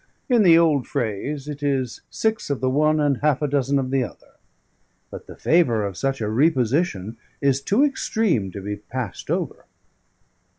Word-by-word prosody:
In 240 -3 +4
the 170 -5 +7
old 155 -6 +3
Phrase, 130 +7 -3
it 145 -1 -6
is 135 -4 -1
six 220 -5 -1
of 140 - -1
the 130 0 0
one 155 +3 +2
and 145 -3 +2
half 145 -1 +1
a - - +2
dozen 140 0 +1
of 130 -1 -2
the 135 -1 +2
other; 120 - -10 0.8
but - - -9
the - - -10
Favour 120 -11 +2
of 100 -2 -5
such 135 +2 -2
a 105 - -1
Reposition 125 - +1 0.2
is 140 -1 +1
too 205 - +2
extreme 220 - 0
to 100 +2 -8
be 105 +1 -4
passed 115 -2 -6
over." - - -3
135 Hz, 175 wpm, -23 LUFS, 120-155 Hz, 0.8 s, the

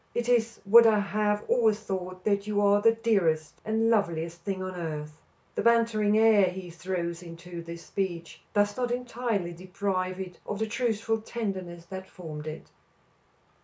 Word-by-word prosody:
"It 240 0 -1
is 235 -2 +2
what 230 +3 +8
I 220 -1 +5
have 210 +1 0
always 220 -4 +3
thought, 185 -3 -5
that 200 -1 +1
you 210 -1 0
are 205 0 +4
the 225 +1 +5
dearest 185 -9 +1
and 225 +1 +1
loveliest 170 -5 0
thing 190 +1 -3
on 185 0 -4
earth." 155 -3 -5 0.3
The - - -1
bantering 225 -2 +3
air 220 -3 +6
he 180 -1 -5
throws 175 -1 -3
into 170 0 -8
this 170 0 -9
speech 180 -4 -4
does 205 0 +3
not 250 -1 -1
entirely 240 -7 -2
deprive 185 +1 -2
it 185 -2 -7
of 205 - -3
the 220 - 0
truthful 225 -1 -1
tenderness 190 -7 -5
that 190 +1 -8
formed 155 -4 -8
it. 155 +1 -7
200 Hz, 165 wpm, -28 LUFS, 175-220 Hz, 0.3 s, what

